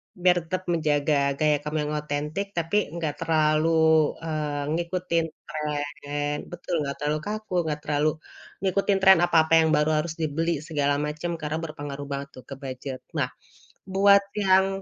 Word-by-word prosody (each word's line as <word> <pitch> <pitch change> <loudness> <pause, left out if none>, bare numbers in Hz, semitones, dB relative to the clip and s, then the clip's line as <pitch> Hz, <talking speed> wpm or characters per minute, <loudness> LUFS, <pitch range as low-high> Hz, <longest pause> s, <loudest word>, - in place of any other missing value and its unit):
Biar 180 0 +3
tetap 185 0 -2
menjaga 150 -2 +1 0.2
gaya 150 -1 +3
kamu 150 +1 -3
yang - - -3
otentik, 150 +6 -3
tapi 170 +5 +1 0.2
enggak 160 -4 -3
terlalu, 160 0 +3
eee, 150 -3 -2
ngikutin 170 -1 -1 0.2
trend. 145 -1 -3
Betul 175 +1 -6
nggak 140 -1 -3
terlalu 150 +1 0
kaku, 215 -2 -5
enggak 150 -1 -2
terlalu 150 0 +1 0.5
ngikutin 195 +1 +1
trend 190 -2 +7
apa-apa 165 -2 +3
yang - - +2
baru 150 +1 +2
harus 170 - -5
dibeli 160 0 -1
segala 145 -3 0
macem, 150 +3 -3
karena 155 +1 -2
berpengaruh 145 -3 -6
banget 140 0 -3
tuh 130 - -10
ke - - -5
budget. 130 -1 -6 0.2
Nah, - - +1 0.6
buat 200 +1 +5 0.2
yang, 190 -1 +4
155 Hz, 150 wpm, -25 LUFS, 145-170 Hz, 0.6 s, trend